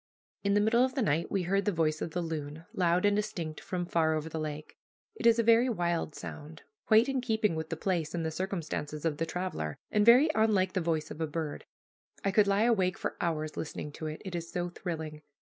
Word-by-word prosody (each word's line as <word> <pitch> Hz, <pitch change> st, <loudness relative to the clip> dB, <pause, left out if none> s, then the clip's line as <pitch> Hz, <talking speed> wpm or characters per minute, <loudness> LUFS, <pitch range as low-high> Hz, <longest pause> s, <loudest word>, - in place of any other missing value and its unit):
In 200 Hz, 0 st, +2 dB
the -, -, +5 dB
middle 230 Hz, +3 st, +4 dB
of 260 Hz, +1 st, 0 dB
the 265 Hz, -, +1 dB
night 160 Hz, -3 st, +1 dB
we 195 Hz, -2 st, 0 dB
heard 195 Hz, +3 st, +1 dB
the 205 Hz, -, +2 dB
voice 155 Hz, -3 st, 0 dB
of -, -, -2 dB
the 175 Hz, +2 st, -2 dB
loon, 155 Hz, -1 st, -5 dB
loud 180 Hz, +1 st, +2 dB
and 205 Hz, 0 st, +4 dB
distinct, 180 Hz, -7 st, -3 dB
from 180 Hz, -1 st, -3 dB
far 160 Hz, -2 st, +2 dB
over 155 Hz, +1 st, -3 dB
the 160 Hz, -, -4 dB
lake. 155 Hz, 0 st, -5 dB, 0.4 s
It 440 Hz, -, 0 dB
is 230 Hz, 0 st, +6 dB
a 230 Hz, -, +3 dB
very 230 Hz, +3 st, +5 dB
wild 170 Hz, -7 st, -1 dB
sound, 155 Hz, +1 st, -8 dB, 0.2 s
quite 220 Hz, +2 st, +6 dB
in 270 Hz, -2 st, 0 dB
keeping 220 Hz, -5 st, +1 dB
with 160 Hz, 0 st, -4 dB
the 165 Hz, -, -3 dB
place 170 Hz, -3 st, -1 dB
and 165 Hz, -2 st, -2 dB
the 160 Hz, -, -1 dB
circumstances 160 Hz, -4 st, -4 dB
of 155 Hz, -3 st, 0 dB
the 165 Hz, -, -1 dB
traveler, 170 Hz, -, -3 dB
and 210 Hz, -, +3 dB
very 250 Hz, +8 st, +7 dB
unlike 210 Hz, -4 st, +2 dB
the 185 Hz, -, 0 dB
voice 160 Hz, -2 st, -1 dB
of 165 Hz, -, -7 dB
a 160 Hz, -, 0 dB
bird. 155 Hz, -1 st, -4 dB, 0.6 s
I 195 Hz, -, +3 dB
could 205 Hz, +1 st, +4 dB
lie 200 Hz, +2 st, +3 dB
awake 195 Hz, -6 st, +2 dB
for -, -, -3 dB
hours 155 Hz, -2 st, -1 dB
listening 150 Hz, -1 st, -5 dB
to 155 Hz, +2 st, -6 dB
it, 155 Hz, 0 st, -6 dB
it 190 Hz, -, -5 dB
is 170 Hz, -1 st, -4 dB
so 175 Hz, 0 st, -2 dB
thrilling. 160 Hz, -4 st, -5 dB
175 Hz, 230 wpm, -30 LUFS, 160-205 Hz, 0.6 s, very